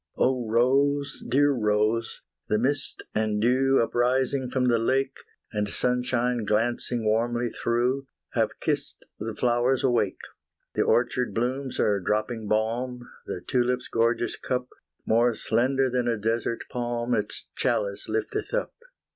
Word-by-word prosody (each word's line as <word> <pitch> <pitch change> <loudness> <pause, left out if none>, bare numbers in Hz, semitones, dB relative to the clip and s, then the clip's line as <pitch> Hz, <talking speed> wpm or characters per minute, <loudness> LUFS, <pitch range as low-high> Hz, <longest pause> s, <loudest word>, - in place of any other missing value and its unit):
Oh 125 -3 +1
Rose, 140 +4 +2
dear 145 +3 +4
Rose! 110 -1 0 0.2
the 105 - +2
mist 135 +6 0
and 110 -1 0
dew 130 +4 +3
Uprising 125 +3 +1
from 130 0 0
the 120 -2 +3
lake, 135 +3 0 0.4
And 105 -1 -1
sunshine 125 -1 0
glancing 115 +2 +1
warmly 120 +2 +1
through, 125 +3 0 0.2
Have - - 0
kissed - - -2
the 110 0 -4
flowers 120 +1 +2
awake 120 -7 +2 0.6
The - - +1
orchard 125 +1 +1
blooms 130 +3 -2
are 100 -1 +2
dropping 110 +3 -1
balm, 120 +4 -1 0.2
The 90 - -4
tulip's 125 0 0
gorgeous 115 +1 +1
cup 125 0 -2 0.4
More 115 +1 +3
slender 130 +5 +1
than 125 -1 0
a 115 -1 +1
desert 115 +2 -1
palm 120 0 -2
It's 105 -2 -2
chalice - - -1
lifteth 420 +2 -2
up. - - -2
120 Hz, 130 wpm, -26 LUFS, 115-130 Hz, 0.6 s, dear